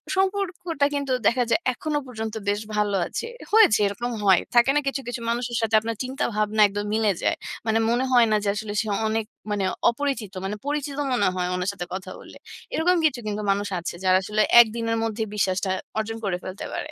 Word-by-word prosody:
সম্পর্ক 385 -1 +1 0.3
টা - - +7
কিন্তু 280 -2 -2 0.2
দেখা 250 +1 +3
যায়, 225 - +3
এখনো 295 +3 -2
পর্যন্ত 220 -2 -5 0.2
বেশ 205 +1 0
ভালো 205 -1 +1
আছে। 465 - -4 0.2
হয়েছে, 425 - +6
এরকম 240 +5 -3
হয়। 190 -2 +6
থাকে 240 +2 +6
না, - - +5
কিছু, 275 0 -1
কিছু 245 -1 -4
মানুষের 240 0 -1
সাথে 220 -1 +1
আপনার 225 +1 -4
চিন্তাভাবনা 215 -5 -1
একদম 205 +1 -4
মিলে 220 -2 +2
যায়। - - +2 0.3
মানে, 220 +1 +2
মনে 245 +3 +1
হয় 240 -2 +7
না - - +4
যে, - - -2
আসলে 210 -1 -4
সে 220 - -5 0.2
অনেক 220 0 -1 0.3
মানে 200 -2 0 0.2
অপরিচিত। 240 -5 -3
মানে 205 +2 -2
পরিচিত 290 -1 -2 0.2
মনে 205 -6 +2
হয়, 180 -1 -1
উনার 180 +2 -1
সাথে 175 -3 -5
কথা 190 0 -6
বললে। - - -13 0.4
এরকম 355 +2 +3
কিছু 260 -5 +2
কিন্তু 210 0 -2
মানুষ 205 +1 -1
আছে, 175 - -5
যারা 185 0 +5
আসলে 210 +1 0 0.2
একদিনের 230 0 -1
মধ্যেই 220 -1 -2
বিশ্বাসটা 190 -1 0 0.3
অর্জন 225 +1 -2
করে 180 -2 0
ফেলতে 185 +1 -6
পারে। 305 - -4
225 Hz, 200 wpm, -24 LUFS, 205-255 Hz, 0.4 s, টা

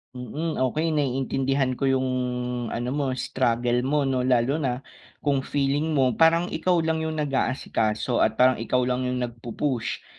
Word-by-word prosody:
Mm, 145 +7 -4
okey 155 +6 0
naiintindihan 135 -1 0
ko 135 - +1
'yong 130 -1 +1 0.6
ano 120 +2 -3
mo 135 -2 -1
struggle 120 -1 0
mo 140 +3 +1
'no, 130 -2 0
lalo 130 +4 +2
na 130 -2 -2 0.4
kung 140 -2 +2
feeling 145 +3 0
mo 130 -2 +3
parang 165 +2 +4
ikaw 175 -2 +1
lang 160 0 0
'yong 160 0 -2
nag-aasikaso 130 -5 0
at 110 - +2
parang 130 0 +4
ikaw 125 +2 +1
lang 125 0 -1
'yong 125 0 -1
nagpu-push 120 +2 -3
130 Hz, 155 wpm, -25 LUFS, 125-145 Hz, 0.6 s, parang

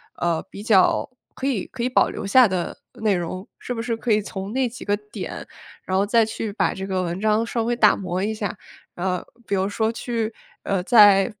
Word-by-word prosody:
呃， 170 -2 0
比 200 - -9
较 210 -4 +4 0.3
可 265 - -5
以 255 -9 -1
可 240 - -6
以 250 - +1
保 255 - +3
留 - - -6
下 245 +4 +6
的 185 -2 -3 0.2
内 215 -2 +1
容。 185 +3 -4
是 245 - -5
不 230 - -5
是 230 -1 -1
可 225 0 -2
以 215 - +4
从 195 +1 -6
那 260 -1 +1
几 240 +1 -9
个 205 0 0
点， 210 +1 -7 0.4
然 185 - -1
后 195 - +3
再 225 +2 +3
去 220 -1 -4
把 200 - 0
这 190 0 -6
个 185 -1 -1
文 175 +2 -3
章 215 +1 +2
稍 230 0 -2
微 240 +1 0
打 215 -3 +5
磨 185 0 -3
一 220 - -1
下。 210 -2 -4 0.4
呃， 180 0 -2 0.2
比 - - -4
如 190 0 +1
说 220 +2 0
去 230 -1 -3 0.3
呃， 195 -2 0
再 200 -2 +7
210 Hz, 235 characters per minute, -23 LUFS, 190-230 Hz, 0.4 s, 再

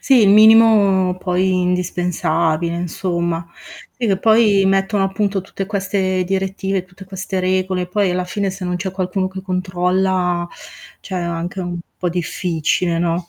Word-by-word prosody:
Sì, 265 -3 +4
il 200 - +5
minimo 210 -3 +5
poi 185 +1 0
indispensabile 170 -2 0
insomma. 170 -1 -2 0.5
Sì, 240 - -1
che 195 -2 +1
poi 215 -2 +4
mettono 195 +1 +1
appunto 195 0 -1
tutte 195 +1 -6
queste 190 -2 -1
direttive, 195 0 -2
tutte 185 +1 -14
queste 190 0 -4
regole, 185 0 0
poi 190 +1 0
alla 180 0 -1
fine 200 +1 -2
se 190 0 -7
non 180 0 -2
c'è 190 +1 -4
qualcuno 185 0 -2
che 190 0 -7
controlla 185 -1 0 0.5
cioè 190 - -8
anche 175 +2 -3
un 175 -1 -4 0.2
po' 180 - -2
difficile, 170 0 -1
no, 170 0 -1
185 Hz, 145 wpm, -18 LUFS, 180-195 Hz, 0.5 s, il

